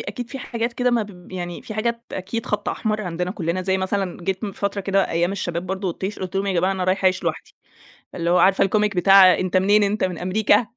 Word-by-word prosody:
أكيد 245 -1 -6
في 270 - -6
حاجات 235 -2 -3
كده 250 +1 +1
ما 235 -2 +2
ب 185 -3 -12
يعني 175 -2 -5
في 215 - -8
حاجات 235 +1 -1
أكيد 200 +5 -4
خط 210 - -2
أحمر 215 -1 -2
عندنا 180 0 -3
كلّنا، 185 -2 -2
زي 190 0 0
مثلًا، 190 -1 -2
جيت 190 +3 -2
من 200 - -4
فترة 200 +1 -2
كده، 195 0 +1
أيّام 170 +3 +1
الشباب 175 -3 -3
برضو 190 +1 -3
والطيش، 190 +3 -4
قلت 185 0 -5
لهم: 195 +1 0
"يا 195 - 0
جماعة 185 +2 +1
أنا 185 -1 -2
رايحة 190 +1 0
أعيش 185 0 +3
لوحدي." - - -4 0.6
اللي 170 -1 -1
هو 180 - +4
عارفة 195 0 +4
الComic 210 +1 +1
بتاع 185 +1 +7
"أنت 185 0 0
منين؟ 205 +3 +4
أنت 205 +2 0
من 180 -2 -1
أمريكا." 205 +6 +2
195 Hz, 235 wpm, -22 LUFS, 185-210 Hz, 0.6 s, بتاع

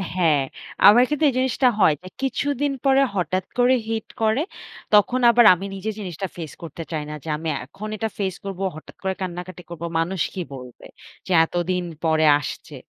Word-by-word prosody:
হ্যাঁ, 160 -6 +3 0.5
আমার 235 +4 +8
কিন্তু 300 +1 -1
এই - - -3
জিনিসটা 260 0 +2
হয় 160 - +5
যে - - -9
কিছুদিন 280 +1 0
পরে 270 0 +5
হঠাৎ 185 0 -1
করে 245 +1 +4
hit 225 -1 -3
করে। 220 +5 +2 0.5
তখন 245 +5 +4
আবার 235 -1 +6
আমি 190 +3 -5
নিজে 195 +3 -4
জিনিসটা 190 -1 -5
ফেস 160 -3 -6
করতে 165 +1 -7
চাই 155 -2 -2
না। - - -5
যে 160 - -7
আমি 160 0 -4 0.2
এখন 210 +10 -8
এটা 220 +1 -1
ফেস 190 -2 -1
করবো, 195 0 -4
হঠাৎ 155 - -12
করে 190 0 0
কান্নাকাটি 180 0 -6
করবো। 170 0 -6
মানুষ 175 +2 -1
কি 185 - -4
বলবে? 125 -2 -11 0.4
যে - - -5
এতদিন 175 +1 -1 0.2
পরে 160 0 +3
আসছে। 145 - -7
185 Hz, 180 wpm, -23 LUFS, 165-225 Hz, 0.5 s, আমার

